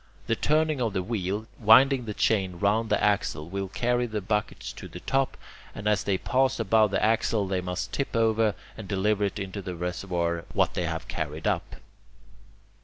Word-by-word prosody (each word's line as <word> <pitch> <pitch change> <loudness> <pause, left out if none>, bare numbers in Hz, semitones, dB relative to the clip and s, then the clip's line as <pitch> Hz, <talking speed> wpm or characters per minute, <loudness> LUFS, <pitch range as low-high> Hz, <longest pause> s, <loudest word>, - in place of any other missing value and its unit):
The - - +1
turning 155 -2 +1
of 115 -4 0
the 95 -2 -1
wheel, 105 0 -2
winding 125 +3 +6
the 105 -2 -5
chain 95 -4 +1
round 105 +4 +1
the - - +1
axle, 100 -7 +1
will 100 0 -2
carry 120 +5 0
the 110 -2 -3
buckets 105 +1 -2
to - - -9
the - - -9
top, 135 0 0 0.4
and 100 +1 -4
as 105 -1 +2
they 95 -2 +1
pass 130 +4 +1
above 110 0 +4
the 95 - 0
axle 110 -2 +1
they 95 -1 -1
must 90 0 -4
tip 140 -3 -2
over 110 -2 +2 0.2
and 110 - -8
deliver 105 +1 +1
into 100 0 -4
the 90 -1 -5
reservoir 85 -1 -2
what - - +2
they - - -1
have - - -4
carried 80 0 -4
up. - - -1
105 Hz, 180 wpm, -27 LUFS, 95-115 Hz, 0.4 s, winding